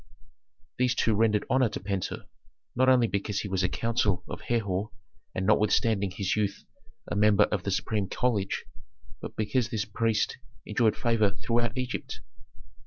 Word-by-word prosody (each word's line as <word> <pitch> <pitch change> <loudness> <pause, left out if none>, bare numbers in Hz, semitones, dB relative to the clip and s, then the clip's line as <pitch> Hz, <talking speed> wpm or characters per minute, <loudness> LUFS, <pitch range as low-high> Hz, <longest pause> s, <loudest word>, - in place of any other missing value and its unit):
These 125 -1 +2
two 115 - +2
rendered 105 -1 +2
honor 130 -3 +3
to 105 - -5
Pentuer, 100 -2 -3 0.5
not 130 +1 +4
only 125 -2 +5
because 100 -1 -2
he - - -5
was 95 -1 0
a 90 - +2
counsellor 115 -4 +1
of - - -7
Herhor 105 -3 -1 0.5
and 95 - -1
notwithstanding 105 -1 +3
his 95 +1 -1
youth 105 -2 -1 0.5
a - - 0
member 105 -1 +5
of - - -1
the - - -3
supreme 105 -3 -1
college, 110 -6 -1 0.6
but - - -7
because 110 +2 0
this 110 -2 -2
priest 110 +1 0 0.3
enjoyed 110 +1 +2
favor 110 -4 +2
throughout 120 +2 0
Egypt. 130 0 -4
105 Hz, 155 wpm, -28 LUFS, 100-120 Hz, 0.6 s, only